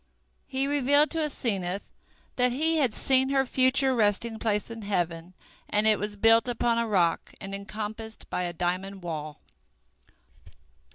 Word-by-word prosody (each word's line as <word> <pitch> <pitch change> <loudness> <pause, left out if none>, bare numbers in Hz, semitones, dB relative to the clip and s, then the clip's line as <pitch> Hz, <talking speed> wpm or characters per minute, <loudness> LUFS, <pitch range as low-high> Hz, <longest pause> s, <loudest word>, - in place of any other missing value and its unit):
He 265 0 -1
revealed 285 +1 +3
to 325 - -2
Asenath 200 -9 -2 0.5
that 250 0 +2
he 320 +6 +1
had 260 -8 +1
seen 265 0 +2
her 270 -1 +2
future 260 +1 +3
resting 220 0 +1
place 210 0 -1
in 230 -1 -7
heaven, 175 -3 -2 0.3
and 210 +1 +1
it 215 -2 +4
was 210 0 -4
built 225 +2 +4
upon 235 -1 +1
a 230 - 0
rock 175 -6 +1
and 195 0 -7
encompassed 215 +2 -6
by - - -3
a 175 -1 -2
diamond 185 +3 -3
wall. 155 -3 -5
220 Hz, 150 wpm, -27 LUFS, 195-255 Hz, 0.5 s, it